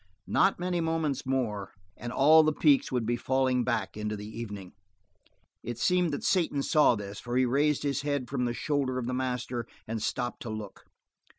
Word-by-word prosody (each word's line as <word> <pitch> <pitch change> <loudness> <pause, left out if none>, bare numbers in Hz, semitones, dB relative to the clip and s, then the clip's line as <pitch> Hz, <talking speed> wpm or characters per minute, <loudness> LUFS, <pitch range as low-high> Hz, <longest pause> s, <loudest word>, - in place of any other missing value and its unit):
Not 195 - +2
many 180 -1 -1
moments 160 -5 -1
more, 110 -8 -2 0.2
and 120 +1 -6
all 155 +5 +6
the 155 0 +2
peaks 150 -2 +3
would 125 -3 0
be 120 +2 +1
falling 130 0 +1
back 110 -6 -1
into 105 0 -3
the 105 - -7
evening. 105 -4 -7 0.9
It 120 0 -5
seemed 180 +5 +2
that 145 - -4
Satan 160 -7 +1
saw 150 -5 +4
this, 100 -1 -7
for 120 0 -3
he 130 - +4
raised 145 +4 +1
his 140 -1 0
head 145 -3 -2
from 125 -2 -1
the 120 - -1
shoulder 140 -3 -1
of 125 - -2
the 125 - -2
master 125 -2 -2 0.2
and 110 0 -3
stopped 120 +2 -2
to 120 - -6
look. 110 -2 -7
125 Hz, 190 wpm, -29 LUFS, 115-145 Hz, 0.9 s, all